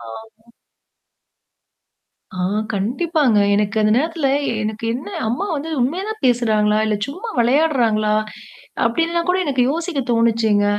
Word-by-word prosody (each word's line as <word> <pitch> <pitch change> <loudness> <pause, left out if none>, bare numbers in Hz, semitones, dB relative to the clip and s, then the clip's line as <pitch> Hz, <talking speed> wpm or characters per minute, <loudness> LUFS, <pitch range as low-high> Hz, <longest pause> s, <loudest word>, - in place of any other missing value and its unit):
ச. - - -12
ஆ." 225 - -13 1.8
ஆ - - -6 0.3
கண்டிப்பாங்க. 255 - 0 0.2
எனக்கு 210 +1 0
அந்த 215 0 +3
நேரத்தில 320 -2 -1 0.3
எனக்கு 215 +1 -4
என்ன 265 +9 -6 0.2
அம்மா 250 - -2
வந்து 315 +3 -5
உண்மைய 320 +10 0
தான் 435 0 -6
பேசுறாங்களா? 215 -4 +2
இல்ல 215 -1 0
சும்மா 370 +12 -7
விளையாடுறாங்களா? 235 -5 +2 0.7
அப்படின்னுலாம் 335 +8 0
கூட 370 - +2
எனக்கு 260 -3 +1
யோசிக்க 330 -3 -2
தோணுச்சுங்க. 225 -3 +2
240 Hz, 120 wpm, -19 LUFS, 215-320 Hz, 1.8 s, அந்த